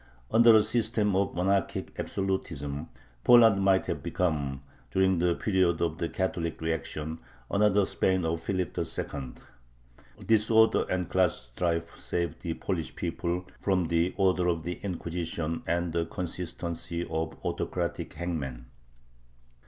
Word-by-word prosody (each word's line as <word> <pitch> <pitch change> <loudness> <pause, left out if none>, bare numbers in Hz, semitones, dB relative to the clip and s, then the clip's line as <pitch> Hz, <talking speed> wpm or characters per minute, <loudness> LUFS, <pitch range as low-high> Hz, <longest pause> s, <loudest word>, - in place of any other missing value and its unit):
Under 115 0 +7
a 110 - +6
system 110 -4 +1
of 100 +1 +1
monarchic 95 +1 0
absolutism, 80 -6 -3 0.3
Poland 115 -5 +7
might 95 -1 +3
have - - -3
become, 70 -6 -1 0.3
during 95 -2 +2
the 85 0 +2
period 95 -5 +2
of 80 -1 -1
the 85 - -1
Catholic 85 -3 -2
reaction, 80 0 -3 0.3
another 100 -1 +4
Spain 95 -2 +1
of 80 0 -1
Philip 95 +1 -2
II. 65 -4 -4 0.9
Disorder 110 0 +4
and 90 -1 -1
class 95 -2 +2
strife 85 +2 -1
saved 85 -1 -2
the 85 -3 -3
Polish 85 -5 -3
people 90 +1 -2 0.2
from 95 -3 +2
the 85 +2 +1
"order" 95 -2 +3
of 85 -2 0
the 90 +1 -4
Inquisition 85 -3 -3
and 85 0 0
the 85 -1 0
consistency 85 -1 -4
of 80 0 -3
autocratic - - -2
hangmen. 70 -9 -4
85 Hz, 130 wpm, -29 LUFS, 80-95 Hz, 0.9 s, Under